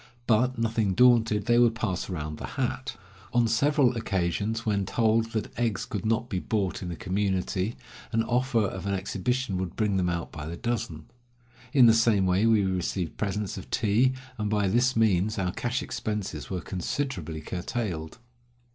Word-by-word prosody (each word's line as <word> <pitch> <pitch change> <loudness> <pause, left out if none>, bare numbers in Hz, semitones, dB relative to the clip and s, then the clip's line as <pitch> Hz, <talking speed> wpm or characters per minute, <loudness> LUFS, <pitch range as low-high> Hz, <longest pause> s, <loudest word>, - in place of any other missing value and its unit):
But, 125 +3 +2
nothing 110 -4 0
daunted, 115 -3 +4
they 120 0 +4
would 120 -2 +4
pass 100 -5 -2
round 75 -4 -4
the - - -5
hat. 130 0 -2 0.4
On 120 -1 +4
several 130 +2 +3
occasions, 105 +2 -1
when 100 -2 +1
told 110 +3 +2
that 110 -2 -3
eggs 115 -5 0
could 105 0 -4
not 115 +1 +1
be 95 -6 -2
bought 100 -2 -1
in 90 - -4
the 85 - -4
community, 95 +2 -1 0.4
an 115 0 +2
offer 120 0 +1
177 100 - -1
of - - -8
an 100 - 0
exhibition 100 +3 -1
would 95 -2 -4
bring 105 -3 +1
them 90 -1 +1
out 85 -1 -3
by 75 0 -7
the 85 +1 -5
dozen. 115 -10 -3 0.7
In 135 -5 +7
the 115 - +7
same 115 -4 +3
way 95 +4 +3
we 110 -3 +4
received 90 -2 -2
presents 105 -1 -2
of - - -11
tea, 115 +5 +2 0.3
and 105 -1 -1
by 105 -2 +1
this 125 +6 +2
means 110 -1 +2
our 90 -2 0
cash 125 +7 -2
expenses 105 -7 -4
were 90 -2 -3
considerably 90 - -3
curtailed. 90 -1 -4
105 Hz, 175 wpm, -27 LUFS, 95-115 Hz, 0.7 s, In